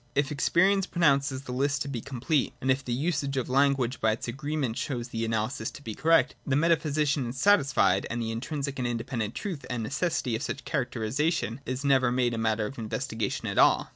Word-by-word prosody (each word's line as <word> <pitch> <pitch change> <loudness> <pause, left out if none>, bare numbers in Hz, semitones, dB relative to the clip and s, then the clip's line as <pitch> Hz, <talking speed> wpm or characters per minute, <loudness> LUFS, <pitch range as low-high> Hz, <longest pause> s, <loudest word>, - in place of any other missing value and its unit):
If 140 +1 +1
experience 190 +6 +3
pronounces 140 -5 +2
the 125 - -7
list 140 +3 0
to - - -8
be 130 -5 -4
complete, 135 +4 -1
and 130 - +1
if 130 +1 0
the 125 - -5
usage 140 +1 -1
of 130 - -1
language, 135 -2 +2
by 110 -1 +3
its 115 - -6
agreement, 135 -1 -2
shows 120 -3 -3
the 115 -1 -3
analysis 110 +2 -1
to 145 - -12
be 110 - -5
correct, 165 +7 +3
the 140 - 0
metaphysician 150 -3 +2
is 125 - -7
satisfied; 140 - +3
and 120 - -3
the 115 -1 -2
intrinsic 135 +4 -4
and 125 - 0
independent 115 -2 -3
truth 180 -9 -4
and 120 -2 -2
necessity 140 -1 -1
of 110 - -3
such 140 -1 -4
characteristics 130 +4 0 0.2
is 130 +2 -3
never 130 -3 +4
made 125 -1 +1
a 115 - -2
matter 110 -1 +1
of 135 - -7
inves 110 +3 -3
tigation 110 -3 -2
at - - -1
all. - - +4
135 Hz, 205 wpm, -28 LUFS, 120-145 Hz, 0.2 s, never